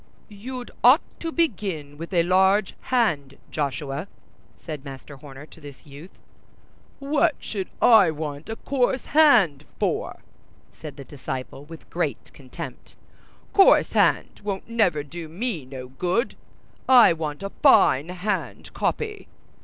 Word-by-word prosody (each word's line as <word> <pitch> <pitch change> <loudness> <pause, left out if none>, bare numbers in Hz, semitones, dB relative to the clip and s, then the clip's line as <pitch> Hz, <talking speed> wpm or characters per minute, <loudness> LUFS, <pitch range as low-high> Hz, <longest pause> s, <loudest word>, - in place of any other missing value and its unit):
"You'd 245 +5 -8
ought 255 +7 +7 0.2
to 330 - -4
begin 195 - -2
with 165 +4 -8
large 190 +3 +3 0.2
hand, 155 - 0
Joshuay," 140 - -3 0.5
said 150 -4 -8
Master 140 0 -10
Horner 140 0 -12
to 160 - -17
this 145 0 -12
youth. 145 +5 -13 0.8
"What 290 +3 +1
should 195 -4 -5
I 220 -7 +7
want 150 0 -6 0.2
coarse 260 -1 0
hand 220 - +5
for?" - - -2 0.5
said 155 -2 -10
the 140 - -9
disciple, 130 0 -7
with 165 +1 -12
great - - -3
contempt; - - -10 0.6
"coarse 390 - +5
hand - - +1
won't 200 -2 -4
never 210 -10 +1
do 165 +3 -8
me 180 - -4
no 130 -1 -9
good. 180 - -1 0.6
I 245 -8 +8
want 155 0 -5
a 195 - -5
fine 140 +6 +5
hand 185 +4 -4
copy." 430 -2 -3
170 Hz, 125 wpm, -24 LUFS, 145-230 Hz, 0.8 s, I